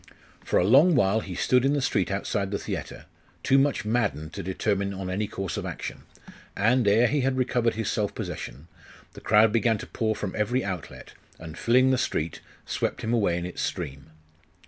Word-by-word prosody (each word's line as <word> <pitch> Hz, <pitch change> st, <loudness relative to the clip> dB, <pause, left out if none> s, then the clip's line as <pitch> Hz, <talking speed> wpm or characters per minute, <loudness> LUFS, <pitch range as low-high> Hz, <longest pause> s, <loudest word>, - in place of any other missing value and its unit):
For -, -, +1 dB
a -, -, +4 dB
long 145 Hz, -, +6 dB
while 110 Hz, -3 st, +3 dB
he 95 Hz, -4 st, -6 dB
stood 125 Hz, +7 st, +2 dB
in 135 Hz, +1 st, +2 dB
the 145 Hz, -, +1 dB
street 100 Hz, -7 st, 0 dB
outside 100 Hz, 0 st, -2 dB
the 100 Hz, -, -2 dB
theatre, -, -, -6 dB, 0.4 s
too 135 Hz, -, +4 dB
much 140 Hz, -5 st, +1 dB
maddened 105 Hz, -9 st, -1 dB
to -, -, -5 dB
determine 100 Hz, +1 st, -1 dB
on 95 Hz, -1 st, -4 dB
any 105 Hz, +3 st, -1 dB
course 95 Hz, -2 st, -4 dB
of -, -, -4 dB
action; -, -, -7 dB, 0.5 s
and, 115 Hz, +2 st, +3 dB
ere 110 Hz, +4 st, +5 dB
he 145 Hz, +3 st, +1 dB
had 130 Hz, 0 st, 0 dB
recovered 120 Hz, -2 st, +1 dB
his 110 Hz, 0 st, -3 dB
self 105 Hz, -2 st, -1 dB
possession, 70 Hz, +7 st, -6 dB, 0.5 s
the -, -, -12 dB
crowd 110 Hz, 0 st, +5 dB
began 115 Hz, -1 st, +2 dB
to -, -, -7 dB
pour 110 Hz, -2 st, -1 dB
from 100 Hz, -3 st, -4 dB
every 115 Hz, +4 st, 0 dB
outlet, 90 Hz, -5 st, -6 dB, 0.2 s
and 80 Hz, -1 st, -9 dB
filling 130 Hz, +5 st, +3 dB
the 130 Hz, -, +2 dB
street, 80 Hz, -9 st, -2 dB, 0.2 s
swept -, -, -2 dB
him 115 Hz, +1 st, -1 dB
away 100 Hz, -7 st, +2 dB
in 85 Hz, -, -3 dB
its 90 Hz, -, -5 dB
stream. 70 Hz, 0 st, -4 dB
105 Hz, 195 wpm, -26 LUFS, 95-125 Hz, 0.5 s, long